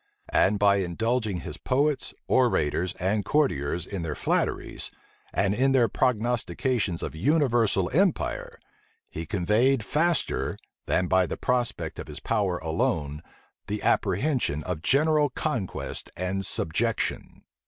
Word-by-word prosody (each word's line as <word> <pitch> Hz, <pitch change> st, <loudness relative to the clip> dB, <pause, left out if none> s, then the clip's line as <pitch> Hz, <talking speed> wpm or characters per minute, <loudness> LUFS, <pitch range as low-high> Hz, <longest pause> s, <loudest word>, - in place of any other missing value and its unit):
And 105 Hz, +2 st, +4 dB
by 100 Hz, 0 st, +4 dB
indulging 105 Hz, +2 st, -1 dB
his -, -, -7 dB
poets, 140 Hz, +1 st, 0 dB, 0.2 s
orators, 90 Hz, -, +2 dB
and 100 Hz, +3 st, 0 dB
courtiers 90 Hz, -, 0 dB
in 100 Hz, -2 st, -5 dB
their 80 Hz, -3 st, -3 dB
flatteries, -, -, -1 dB, 0.4 s
and 100 Hz, 0 st, +1 dB
in 135 Hz, +4 st, +2 dB
their 125 Hz, -3 st, +4 dB
prognostications 120 Hz, -5 st, 0 dB
of -, -, -4 dB
universal 115 Hz, -, +2 dB
empire, 185 Hz, +2 st, 0 dB, 0.5 s
he 80 Hz, +1 st, -6 dB
conveyed 110 Hz, +6 st, +2 dB
faster, 170 Hz, +3 st, 0 dB, 0.3 s
than 90 Hz, -, +2 dB
by 95 Hz, 0 st, +3 dB
the -, -, -4 dB
prospect 125 Hz, -2 st, -1 dB
of -, -, -6 dB
his -, -, -7 dB
power 95 Hz, -4 st, 0 dB
alone, 80 Hz, -2 st, -1 dB, 0.5 s
the 105 Hz, 0 st, -3 dB
apprehension 100 Hz, -, +1 dB
of 90 Hz, -3 st, -4 dB
general 150 Hz, -, +3 dB
conquest 120 Hz, -, -3 dB
and 95 Hz, +1 st, -2 dB
subjection. 110 Hz, +8 st, -2 dB
105 Hz, 120 wpm, -26 LUFS, 90-130 Hz, 0.5 s, And